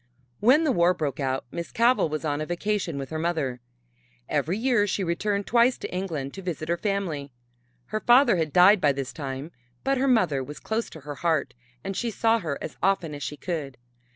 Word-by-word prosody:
When 265 +9 +5
the 305 - +2
war 180 -5 +3
broke 145 -5 -3
out 135 -1 -1
Miss 170 0 -5
Cavell 235 -6 +3
was 155 +1 -3
on 145 0 -1
a - - -2
vacation 175 -2 -2
with 135 +1 -6
her 160 - -3
mother. 155 -7 -1 0.7
Every 180 +6 0
year 230 -3 +2
she 195 0 -1
returned 200 +4 -1
twice 240 +2 +3
to - - -7
England 160 -8 -3
to 195 - -7
visit 170 -4 -4
her 170 - +1
family. 170 -8 -2 0.5
Her 215 - -3
father 240 -2 +5
had 160 -3 -1
died 185 +4 +6
by 145 -1 +4
this 135 -1 -5
time, 140 +1 -5 0.3
but 270 -1 +1
her 270 - +2
mother 180 - +2
was 150 +3 -9
close 225 +1 -2
to 160 - -11
her 145 +1 -6
heart 160 -6 +1 0.3
and 195 - -4
she 235 - -1
saw 225 +1 +2
her 155 -8 -3
as - - -7
often 185 -5 +1
as 145 - -7
she 150 - -4
could. 145 -6 -4
170 Hz, 210 wpm, -26 LUFS, 150-210 Hz, 0.7 s, died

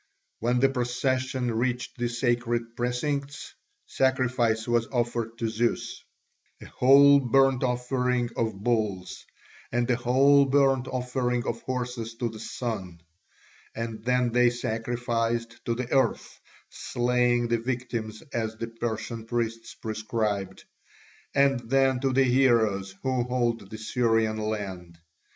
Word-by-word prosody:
When 120 +2 +1
the 135 - +5
procession 130 -1 -1
reached 120 +2 -2
the 120 0 0
sacred 120 -1 -1
precincts, 140 +3 -3 0.3
sacrifice 125 -4 +1
was 120 -1 +1
offered 120 -2 -2
to 115 - -1
Zeus, 115 +2 -1 0.6
a - - -11
whole 140 +2 +6
burnt 135 0 +3
offering 125 -1 0
of 110 -3 -1
bulls, 105 -6 -1 0.5
and 120 0 0
a - - +3
whole 135 +4 +4
burnt 135 -2 +2
offering 125 -1 -1
of 115 - -3
horses 125 -3 -4
to 120 0 -2
the 110 -1 -10
Sun; 100 -8 -5 0.7
and 115 -1 -5
then 125 0 +1
they 125 +1 +4
sacrificed 115 0 -2
to 115 - 0
the 125 0 -5
Earth, 130 -4 0 0.3
slaying 120 -1 +1
the 115 -1 +1
victims 115 -3 -4
as 110 -1 -2
the 115 +1 -5
Persian 115 0 -4
priests 115 -1 -3
prescribed, 110 -3 -3 0.7
and 140 -2 +4
then 135 -1 +3
to 135 0 0
the 135 +1 +4
heroes 115 -7 +2
who 130 -1 +1
hold 120 -5 -1
the 110 - -7
Syrian 115 -1 +1
land. 100 -6 -4
120 Hz, 125 wpm, -27 LUFS, 115-125 Hz, 0.7 s, whole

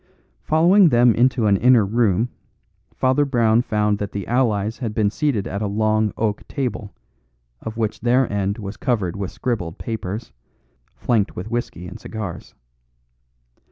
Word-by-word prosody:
Following 175 +4 +5
them 120 -2 +5
into 120 +1 +2
an 100 -2 +4
inner 120 -1 +5
room, 110 +1 +1 0.6
Father 130 +3 +2
Brown 120 -4 +3
found 105 -3 0
that 100 - -4
the 100 -2 -4
allies 115 -3 0
had 115 -5 -4
been 105 -2 +2
seated 135 -7 -1
at 100 +2 -4
a 105 - 0
long 110 +1 +1
oak 105 -2 -1
table, 125 -7 -4 0.7
of 110 0 -7
which 110 -2 -2
their 125 +2 +3
end 100 +1 -1
was 100 -2 -7
covered 105 -9 -1
with 100 -2 -4
scribbled 105 -10 -3
papers, 110 -1 -5 0.6
flanked 110 -5 0
with 100 +6 -6
whisky 120 -7 -3
and 95 +5 -9
cigars. 105 -7 -7
110 Hz, 150 wpm, -21 LUFS, 100-120 Hz, 0.7 s, Following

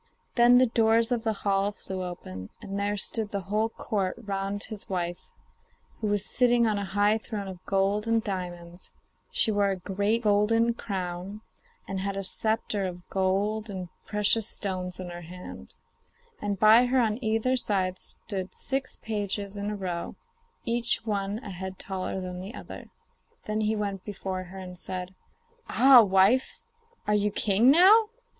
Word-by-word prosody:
Then 240 0 +6
the 255 - +6
doors 225 0 +2
of 235 -2 0
the 225 - +1
hall 200 0 +2
flew 190 -2 -6
open, 95 - -7
and 200 -1 -5
there 205 +1 0
stood 220 +1 +4
the 200 -1 -3
whole 210 +4 0
Court 200 -4 -2
round 200 -1 -3
his 215 -3 -8
wife, 175 -2 -3 0.7
who 215 - -2
was 205 0 +1
sitting 240 -1 +3
on 215 -2 +1
a 200 - -3
high 205 +2 +4
throne 210 -3 -5
of 185 -2 -9
gold 200 +2 +1
and 225 -1 +2
diamonds; 175 -3 -6 0.4
she 475 - +2
wore 205 -1 +2
a 195 - 0
great 200 +5 -1
golden 225 +3 +3
crown, 190 -1 -5 0.5
and 195 -1 -3
had 195 +1 -3
a 195 - -2
sceptre 220 +1 -1
of 180 -1 -5
gold 200 +3 0
and 185 -3 -5 0.2
precious 210 +1 +2
stones 185 -2 -4
in 180 -1 -6
her 175 0 -7
hand, 180 +2 -10 0.7
and 205 -2 -2
by 225 +3 +7
her 260 +1 +2
on 225 +1 0
either 225 +4 +1
side 190 -6 0
stood 190 -3 -5
six 270 -1 -3
pages 205 -2 -3
in 205 0 -3
a 210 - -3
row, 180 -4 -4 0.5
each 235 0 +1
one 200 -1 -1
a 200 - -7
head 190 +1 -6
taller 190 0 -4
than 180 -1 -5
the 195 +7 -7
other. - - -9 0.6
Then 215 +1 -1
he 215 +1 +1
went 200 -3 -3
before 190 -2 -5
her 185 +2 -11
and 180 -1 -8
said: 185 0 -5 0.6
'Ah, 260 -2 +8
wife! 200 +5 +3 0.5
are 210 - +1
you 210 0 +2
king 210 +4 +3
now? 400 +8 +7
205 Hz, 165 wpm, -27 LUFS, 190-220 Hz, 0.7 s, Ah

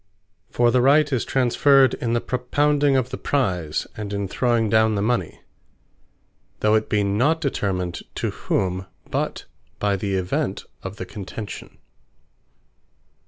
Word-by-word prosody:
For 120 -1 +3
the 125 - +3
Right 145 +2 +4
is 125 - +1
transferred 135 +1 +4
in 115 -1 -2
the 120 - +1
Propounding 145 +2 +1
of 130 -1 -1
the - - -5
Prize, 90 - -1
and 105 -1 -5
in 100 -1 -2
throwing 120 +1 +1
down 110 0 +3
the 100 - 0
mony; 120 +2 -1 1.2
though 105 0 +3
it 110 0 +1
be 105 -1 +2
not 125 +12 +2
determined 95 - -2 0.2
to - - -2
whom, 95 -1 -2 0.2
but - - -2 0.3
by 100 -1 +1
the 100 0 -2
Event 95 -1 -2 0.2
of 95 +1 -6
the 95 - -6
contention. 100 +2 -8
110 Hz, 140 wpm, -23 LUFS, 100-130 Hz, 1.2 s, Right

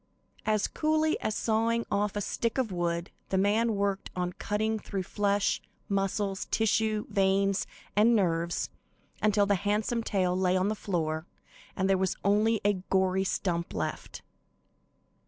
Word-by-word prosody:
As 215 -1 +2
coolly 310 0 +1
as 215 - -1
sawing 230 +1 +1
off 205 0 0
a 205 - -1
stick 230 +4 -2
of 250 -6 0
wood, 170 -1 -2 0.2
the 190 - +1
man 215 +3 +2
worked 200 -1 -1
on, 180 0 -2
cutting 220 +3 -1
through 195 -2 -4
flesh, 205 +1 +1 0.3
muscles, 195 0 -1
tissues, 220 -1 +1
veins 195 -1 +2 0.3
and 225 +3 +5
nerves 170 -4 0 0.5
until 210 -1 +3
the 200 - +2
handsome 210 +4 0
tail 185 -5 0
lay 185 0 +2
on 185 +2 +1
the - - +1
floor 160 -5 -2 0.5
and 190 -1 +1
there 195 -1 +3
was 190 -1 0
only 215 +2 +3
a 205 -3 +2
gory 190 0 +2
stump 175 -3 -2
left. - - -4
200 Hz, 145 wpm, -29 LUFS, 190-215 Hz, 0.5 s, and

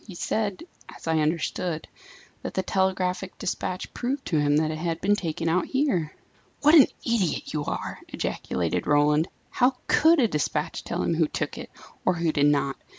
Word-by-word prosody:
"He 190 - -9
said 205 - -2 0.3
as - - -12
I 160 -1 +2
understood 160 +1 -1 0.5
that - - -6
the 190 - 0
telegraphic 190 0 -1
despatch 185 -2 -3
proved 260 +3 -3
to 160 - +1
him 145 0 +3
that 155 0 +1
it 155 - -5
had 165 0 -2
been 205 +2 +3
taken 165 -4 -3
out 170 +2 +1
here." 210 - 0 0.5
"What 300 +2 +5
an 300 -5 +9 0.2
idiot 220 -8 0
you 150 -1 -2
are!" - - -4
ejaculated 85 -2 -2
Roland. 150 +2 +3 0.2
"How 250 +1 +2
could 320 +1 +5
a 240 - +4
despatch 150 -7 -2
tell - - -2
him - - +1
who 160 -1 +2
took - - -3
it, - - -8 0.3
or 185 - +2
who 165 -1 +1
did 145 -1 +3
not? 140 -2 +1
170 Hz, 180 wpm, -26 LUFS, 155-205 Hz, 0.5 s, an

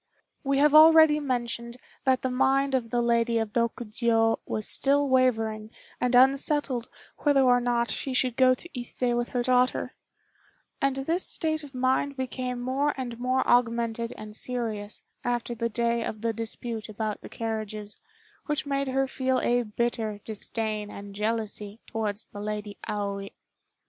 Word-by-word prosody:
We 275 -1 +1
have 295 +1 +4
already 315 -1 +8
mentioned 240 -3 -3 0.3
that 260 -1 +2
the 260 - 0
mind 270 +2 +2
of 245 -3 0
the 240 +1 +1
Lady 235 0 +2
of 225 -1 -2
Rokjiô 230 -1 +1
was 215 -1 -3
still 285 +1 +2
wavering 225 -5 +1 0.3
and 250 0 +1
unsettled 265 -1 +3 0.3
whether 285 -2 +3
or 250 -1 +4
not 240 -1 +1
she 270 - -3
should 250 -2 +2
go 255 0 +5
to 345 - -11
Ise 240 0 -2
with 240 0 -1
her 245 -1 -1
daughter; 255 0 +2 0.9
and 275 -1 +2
this 325 +7 0
state 315 -1 0
of 280 -2 -11
mind 260 +2 +1
became 255 -1 -3
more 270 +4 0
and 240 -3 -5
more 255 +1 +1
augmented 235 -1 +2
and 210 0 -8
serious 220 -4 -3 0.2
after 240 0 -1
the 230 0 -2
day 235 +1 0
of 215 -1 -5
the 230 0 0
dispute 225 0 -5
about 215 0 -3
the - - -10
carriages, 215 -2 -5 0.5
which 295 -1 -1
made 275 -1 -1
her 270 +1 +1
feel 260 -1 0
a 245 0 +2
bitter 220 -1 -2
disdain 215 -1 -3
and 200 -1 -9
jealousy 210 0 -3
towards 215 -1 -3
the 205 - -9
Lady 210 -1 -4
Aoi. 200 -1 -3
240 Hz, 155 wpm, -27 LUFS, 220-260 Hz, 0.9 s, already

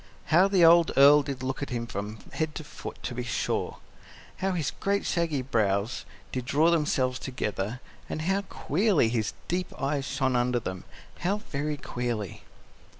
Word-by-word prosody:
How 180 +4 +7
the 190 -4 +5
old 170 0 +7
Earl 145 +2 +8
did 135 -2 -5
look 130 +2 -3
at 140 - -3
him 120 -2 -2
from 105 0 -5 0.2
head 160 -2 -2
to 155 - -5
foot, 150 - -8
to 125 - -3
be 125 - -3
sure! 120 -1 -2 0.6
How 190 0 0
his 160 -6 -1
great 200 0 -1
shaggy 165 -6 0
brows 105 -3 0 0.3
did 125 -1 -3
draw 150 +5 +3
themselves 130 -6 +1
together, 110 -3 -3 0.3
and 155 - -3
how 190 +4 +1
queerly 190 - +1
his 110 -3 -1
deep 180 +1 -1
eyes 135 0 -1
shone 130 -3 0
under 120 0 +2
them 95 -5 -6 0.3
how 190 +4 +1
very 150 -7 -3
queerly! 120 - -4
140 Hz, 165 wpm, -28 LUFS, 120-165 Hz, 0.6 s, Earl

